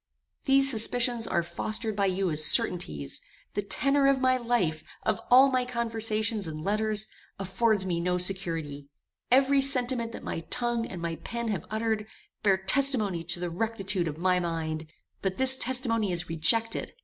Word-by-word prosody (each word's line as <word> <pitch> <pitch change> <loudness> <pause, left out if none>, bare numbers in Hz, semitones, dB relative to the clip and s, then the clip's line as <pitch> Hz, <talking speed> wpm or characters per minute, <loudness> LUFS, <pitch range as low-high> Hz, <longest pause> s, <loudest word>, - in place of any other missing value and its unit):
These 275 0 +5
suspicions 235 0 +1
are 170 - 0
fostered 215 +5 -2
by 200 -1 +1
you 190 -1 -1
as 155 0 +1
certainties; 75 - +1 0.3
the 205 - -1
tenor 275 +7 +2
of 275 -1 +2
my 255 0 +2
life, 235 -11 -1 0.2
of 215 -3 -1
all 265 +2 +6
my 255 -1 +1
conversations 225 -4 0
and 155 -1 -6
letters, 215 +1 0 0.3
affords 195 +1 +1
me 175 -2 -2
no 180 +1 0
security; 165 -6 -2 0.4
every 270 +2 +4
sentiment 250 -3 +2
that - - -9
my - - -4
tongue 240 -1 -1
and 175 -2 -8
my 165 -1 -3
pen 235 +7 -5
have 195 -7 -3
uttered, 220 -1 -2 0.3
bear 195 -3 +3
testimony 205 -3 +1
to 175 +1 -1
the 175 -1 -4
rectitude 195 -2 -2
of 150 -1 -5
my 180 +1 +1
mind; 160 -2 -4 0.3
but 190 -1 -3
this 265 0 +7
testimony 235 -5 0
is 175 0 +1
rejected. 225 +8 +1
215 Hz, 160 wpm, -27 LUFS, 175-240 Hz, 0.4 s, this